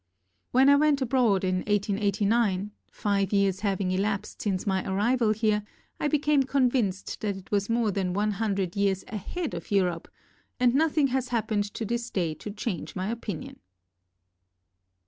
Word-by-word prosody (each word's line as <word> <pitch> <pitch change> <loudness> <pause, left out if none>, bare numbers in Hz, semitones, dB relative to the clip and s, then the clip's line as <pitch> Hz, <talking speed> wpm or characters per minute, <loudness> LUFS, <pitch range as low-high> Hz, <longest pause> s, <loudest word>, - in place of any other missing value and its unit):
When 260 +2 +4
I 285 0 +7
went 300 -1 +3
abroad 235 -7 +2
in 185 0 +1
1889 205 0 +1
— - - -43
five 200 -2 0
years 200 -2 +2
having 195 -3 -1
elapsed 195 +2 -2
since 190 -3 -1
my 190 -2 0
arrival 225 +3 +2
here 215 -1 +1 0.2
— - - -41
I - - +1
be 300 - +3
came 295 -1 +3
convinced 250 -7 0
that 205 -2 -2
it 190 - -14
was 200 0 0
more 230 -2 +2
than 190 -2 -1
one 210 +2 +1
hundred 200 -4 -1
years 200 -2 +1
AHEAD 280 - -4
of 170 -1 -6
Europe 180 -4 +1 0.5
and 245 -1 +4
nothing 295 -1 +3
has 260 0 -1
happened 220 -3 0
to 225 - -3
this 235 +2 -2
day 170 -5 -1
to 155 - -8
change 205 -3 -4
my 190 +1 -2
opinion. 210 -8 -6
210 Hz, 165 wpm, -27 LUFS, 195-240 Hz, 0.5 s, I